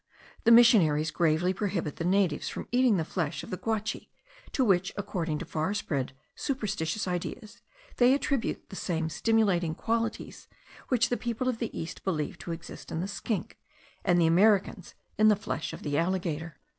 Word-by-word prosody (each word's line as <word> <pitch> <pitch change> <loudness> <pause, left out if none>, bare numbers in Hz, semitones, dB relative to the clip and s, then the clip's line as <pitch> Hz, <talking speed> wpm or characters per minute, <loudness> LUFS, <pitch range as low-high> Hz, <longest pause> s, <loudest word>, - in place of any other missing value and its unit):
The 230 - +6
missionaries 175 -11 +6
gravely 170 +2 +2
prohibit 185 -6 -2
the - - -3
natives 185 -4 +1
from - - -6
eating 245 -4 +4
the 160 - -1
flesh 155 -4 -3
of - - -9
the 185 - -2
guachi, 220 0 -3 0.4
to 260 - +1
which, 190 -3 +2
according 180 -6 -2
to 180 - -5
far 165 +4 -2
spread 140 -10 -2 0.2
superstitious 210 - -2
ideas, 195 +5 -5 0.4
they 250 +2 +6
attribute 275 -3 -2
the - - -7
same 165 -4 -2
stimulating 190 -6 +1
qualities 230 +3 -3 0.4
which 235 -2 +2
the 245 - 0
people 240 +1 -3
of 245 -3 0
the 230 - -2
East 165 +2 -6
believe 155 -6 -2
to 170 - -6
exist 165 0 -8
in 160 - -2
the 185 - -2
skink, 200 +1 -4 0.4
and 175 -2 +3
the 170 - +4
Americans 190 +1 +3 0.2
in 215 - +6
the 210 - +6
flesh 205 - -4
of - - -9
the 145 -1 -2
alligator. 165 -3 -2
190 Hz, 170 wpm, -29 LUFS, 165-220 Hz, 0.4 s, The